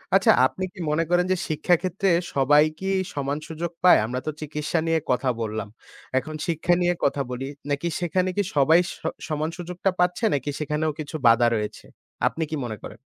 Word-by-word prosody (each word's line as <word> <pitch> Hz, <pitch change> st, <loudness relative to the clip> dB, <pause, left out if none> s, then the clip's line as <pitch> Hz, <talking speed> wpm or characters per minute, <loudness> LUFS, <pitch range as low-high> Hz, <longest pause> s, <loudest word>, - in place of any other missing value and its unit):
আচ্ছা -, -, +6 dB
আপনি 130 Hz, +8 st, -2 dB
কি 200 Hz, -, -14 dB
মনে 160 Hz, +2 st, +2 dB
করেন, 175 Hz, 0 st, +3 dB
যে 185 Hz, -, +2 dB
শিক্ষা 165 Hz, +3 st, +2 dB
ক্ষেত্রে 190 Hz, +1 st, 0 dB, 0.3 s
সবাই 145 Hz, +2 st, +5 dB, 0.2 s
কি 190 Hz, -, -3 dB, 0.2 s
সমান 140 Hz, 0 st, -2 dB
সুযোগ 165 Hz, +1 st, -4 dB
পায়? 180 Hz, -, +8 dB
আমরা 125 Hz, +3 st, -3 dB
তো 155 Hz, -, +1 dB
চিকিৎসা 150 Hz, +2 st, -2 dB
নিয়ে 165 Hz, 0 st, +2 dB
কথা 125 Hz, +1 st, +1 dB
বললাম। 110 Hz, 0 st, -3 dB, 0.5 s
এখন 155 Hz, +3 st, -7 dB
শিক্ষা 170 Hz, +1 st, +1 dB
নিয়ে 175 Hz, 0 st, +3 dB
কথা 140 Hz, 0 st, +2 dB
বলি, 130 Hz, +2 st, -4 dB, 0.2 s
নাকি 145 Hz, +4 st, -1 dB
সেখানে 180 Hz, +1 st, 0 dB
কি 205 Hz, -, +3 dB
সবাই 155 Hz, +4 st, +5 dB
স -, -, -6 dB, 0.3 s
সমান 155 Hz, 0 st, -1 dB
সুযোগটা 180 Hz, +2 st, -2 dB
পাচ্ছে 180 Hz, +5 st, +2 dB
নাকি 140 Hz, 0 st, -1 dB
সেখানেও 150 Hz, +1 st, -1 dB
কিছু 155 Hz, +1 st, -6 dB
বাধা 115 Hz, +1 st, +6 dB
রয়েছে? 105 Hz, -1 st, -4 dB, 0.4 s
আপনি 160 Hz, -, -2 dB
কি -, -, -1 dB
মনে 110 Hz, -3 st, -5 dB
করেন? -, -, -9 dB
155 Hz, 185 wpm, -24 LUFS, 140-175 Hz, 0.5 s, পায়